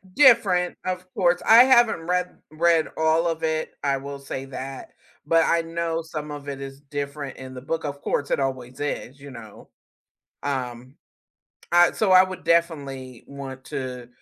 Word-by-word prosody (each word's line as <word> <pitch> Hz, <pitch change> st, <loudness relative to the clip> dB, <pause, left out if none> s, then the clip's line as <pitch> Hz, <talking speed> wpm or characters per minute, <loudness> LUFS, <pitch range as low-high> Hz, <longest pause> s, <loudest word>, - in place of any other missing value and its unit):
Different, 205 Hz, -10 st, +5 dB
of 185 Hz, 0 st, -3 dB
course, 175 Hz, -1 st, +2 dB
I 230 Hz, +2 st, +9 dB
haven't 240 Hz, -9 st, +4 dB
read 180 Hz, 0 st, -1 dB
read 165 Hz, 0 st, +2 dB
all 160 Hz, +1 st, +2 dB
of 165 Hz, -1 st, -1 dB
it, 160 Hz, 0 st, -1 dB
I 140 Hz, -, +2 dB
will 140 Hz, +1 st, -7 dB
say 135 Hz, -1 st, -6 dB
that, 135 Hz, 0 st, -7 dB, 0.4 s
but 165 Hz, 0 st, +4 dB
I 170 Hz, -, +2 dB
know 165 Hz, 0 st, -2 dB
some 155 Hz, -2 st, -6 dB
of 145 Hz, -1 st, -7 dB
it 135 Hz, -, -5 dB
is 135 Hz, 0 st, -8 dB
different 140 Hz, -1 st, -5 dB
in 130 Hz, 0 st, -9 dB
the 125 Hz, -, -8 dB
book, 160 Hz, +3 st, -3 dB
of 145 Hz, 0 st, -5 dB
course, 145 Hz, -, -1 dB
it -, -, +1 dB
always 130 Hz, -2 st, -4 dB
is, 140 Hz, -2 st, -4 dB
you 140 Hz, 0 st, -11 dB
know, 115 Hz, -4 st, -12 dB, 0.7 s
um, 130 Hz, -2 st, -4 dB, 0.7 s
I 175 Hz, 0 st, +5 dB
so 215 Hz, -4 st, 0 dB
I 185 Hz, 0 st, +8 dB
would 185 Hz, -1 st, -7 dB
definitely 140 Hz, -7 st, -1 dB
want 135 Hz, -2 st, -8 dB
to 125 Hz, -2 st, -5 dB
145 Hz, 170 wpm, -24 LUFS, 135-170 Hz, 0.7 s, I